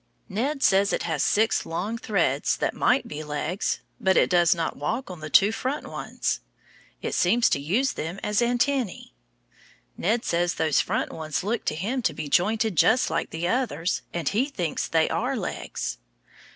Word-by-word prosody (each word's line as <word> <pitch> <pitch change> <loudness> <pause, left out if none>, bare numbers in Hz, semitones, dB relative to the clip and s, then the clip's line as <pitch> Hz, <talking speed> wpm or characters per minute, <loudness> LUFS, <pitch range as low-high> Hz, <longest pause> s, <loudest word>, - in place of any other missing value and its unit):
Ned 270 +8 -2
says 195 +1 +4
it - - -1
has 160 -4 -1
six 220 +2 +2
long 190 +7 -3
threads 175 -11 0
that - - -1
might - - +2
be 150 +1 -6
legs, 150 +5 -2 0.2
but 190 0 +3
it - - +3
does 175 0 +5
not 165 -1 -2
walk 220 - -3
on 180 - -8
the 155 0 -6
two 200 +7 +5
front 260 +6 -3
ones. - - -3 0.6
It - - -2
seems 230 +7 +3
to - - +2
use 205 - +1
them 170 +5 -5
as 210 +2 +1
antennæ. 245 -1 0 0.9
Ned 225 +5 0
says 175 +1 +1
those 160 -2 +2
front - - -2
ones 155 0 -3
look 220 +4 -2
to - - 0
him 225 +11 -2
to - - 0
be 155 -1 -4
jointed 215 +5 +2
just 250 - +4
like 165 - -1
the 165 +2 -3
others, 185 - 0
and 170 -4 -3
he 225 - +2
thinks 180 - -2
they 160 -1 +2
are - - -1
legs. - - -4
185 Hz, 180 wpm, -25 LUFS, 160-230 Hz, 0.9 s, does